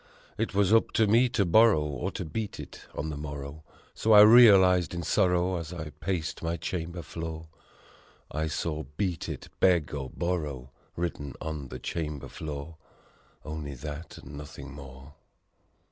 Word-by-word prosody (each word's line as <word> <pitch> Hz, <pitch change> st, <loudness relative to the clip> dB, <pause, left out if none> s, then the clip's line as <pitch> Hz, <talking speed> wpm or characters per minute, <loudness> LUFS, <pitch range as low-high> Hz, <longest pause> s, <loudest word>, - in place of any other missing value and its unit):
It -, -, -2 dB
was 100 Hz, +1 st, +3 dB
up 115 Hz, -, +4 dB
to 110 Hz, -, +4 dB
me 115 Hz, +4 st, +4 dB
to 105 Hz, -4 st, +1 dB
borrow 100 Hz, -2 st, +5 dB
or 70 Hz, -3 st, -3 dB
to -, -, -4 dB
beat 105 Hz, +6 st, -4 dB
it -, -, -10 dB
on 80 Hz, +2 st, -3 dB
the 75 Hz, -, -5 dB
morrow 75 Hz, 0 st, -7 dB, 0.3 s
So 110 Hz, -, +2 dB
I 105 Hz, -, +10 dB
realized 95 Hz, -6 st, +7 dB
in 85 Hz, -, -3 dB
sorrow 90 Hz, +2 st, +2 dB
as 85 Hz, -1 st, -6 dB
I 80 Hz, -4 st, -6 dB
paced 80 Hz, +2 st, -3 dB
my 85 Hz, 0 st, -2 dB
chamber 85 Hz, +1 st, -4 dB
floor; 80 Hz, -1 st, -6 dB, 0.8 s
I 80 Hz, +1 st, -1 dB
saw, 80 Hz, 0 st, -2 dB, 0.2 s
"Beat 95 Hz, -5 st, -2 dB
it, -, -, -7 dB
beg 85 Hz, -6 st, +3 dB
or 70 Hz, -3 st, -4 dB
borrow!" 75 Hz, -8 st, -3 dB, 0.2 s
written 80 Hz, -5 st, -4 dB
on 75 Hz, -3 st, -5 dB
the 65 Hz, -, -7 dB
chamber 75 Hz, +1 st, -4 dB
floor 75 Hz, +1 st, -7 dB, 0.7 s
Only 75 Hz, -2 st, -5 dB
that 75 Hz, +5 st, -7 dB
and 70 Hz, +2 st, -11 dB
nothing 70 Hz, -2 st, -9 dB
more. 70 Hz, 0 st, -11 dB
80 Hz, 160 wpm, -28 LUFS, 75-90 Hz, 0.8 s, I